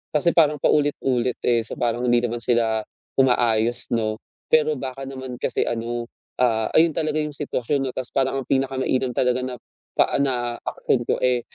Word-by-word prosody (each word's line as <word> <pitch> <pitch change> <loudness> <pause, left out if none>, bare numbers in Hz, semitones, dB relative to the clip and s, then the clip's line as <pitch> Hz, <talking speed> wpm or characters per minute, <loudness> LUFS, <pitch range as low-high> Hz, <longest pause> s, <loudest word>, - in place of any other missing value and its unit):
kasi 160 +3 +4
parang 150 -3 +4
paulit-ulit, 130 -4 +1
eh, 120 -1 +3
so, - - -7
parang 120 +1 0
hindi 120 0 +4
naman 120 0 -3
sila 115 -2 +1 0.4
umaayos, 120 -2 +2
'no. 110 -1 0 0.3
Pero 155 -1 +4
baka 135 0 -5
naman 130 -2 -7
kasi 125 - 0
ano, 120 +1 -2 0.4
ah, 110 -3 +2
ayon 160 -1 +5
talaga 155 -1 -1
'yong 150 -1 -4
sitwasyon, 140 -1 -1
'no, 130 - -2
tas 130 -2 -3
parang 135 0 +1
ang - - -25
pinakamainam 130 -1 0
talaga 125 +1 +1
na, 125 -1 -4 0.4
pa - - +3
na 120 -3 -1
aksyon 120 - 0
ko, - - +3
eh, 125 -1 +3
125 Hz, 170 wpm, -23 LUFS, 120-135 Hz, 0.4 s, ayon